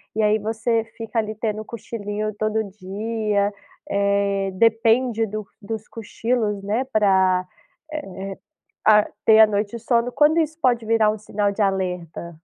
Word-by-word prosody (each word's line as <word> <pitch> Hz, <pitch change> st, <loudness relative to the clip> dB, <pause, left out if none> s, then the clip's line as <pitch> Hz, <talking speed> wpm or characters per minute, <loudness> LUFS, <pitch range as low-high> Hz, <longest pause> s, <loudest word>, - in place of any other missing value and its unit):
e 220 Hz, -, +1 dB
aí 210 Hz, +1 st, +3 dB
você 225 Hz, +1 st, 0 dB
fica 225 Hz, 0 st, -2 dB
ali, 215 Hz, 0 st, -2 dB
tendo 215 Hz, 0 st, -3 dB
cochilinho 215 Hz, -2 st, -4 dB
todo 215 Hz, +1 st, 0 dB
dia, 205 Hz, +1 st, -2 dB, 0.4 s
eh, 200 Hz, -1 st, +1 dB
depende 225 Hz, +2 st, +3 dB
do 210 Hz, -1 st, -5 dB
dos 220 Hz, +1 st, -6 dB
cochilos, 220 Hz, -2 st, -2 dB
né, 220 Hz, +6 st, -1 dB
para, 190 Hz, -6 st, +3 dB, 0.5 s
eh, 305 Hz, -, -2 dB, 0.9 s
ah, 210 Hz, -1 st, +6 dB, 0.2 s
ter 220 Hz, 0 st, +7 dB
a 220 Hz, -, +9 dB
noite 210 Hz, +2 st, -2 dB
de 230 Hz, -, -10 dB
sono, 240 Hz, 0 st, +1 dB
quando 300 Hz, +3 st, +4 dB
isso 315 Hz, +1 st, -2 dB
pode 240 Hz, -5 st, +2 dB
virar 220 Hz, -1 st, +3 dB
um 215 Hz, -, -4 dB
sinal 205 Hz, -1 st, -1 dB
de 215 Hz, -, -7 dB
alerta? 180 Hz, -3 st, -2 dB
215 Hz, 150 wpm, -22 LUFS, 200-225 Hz, 0.9 s, a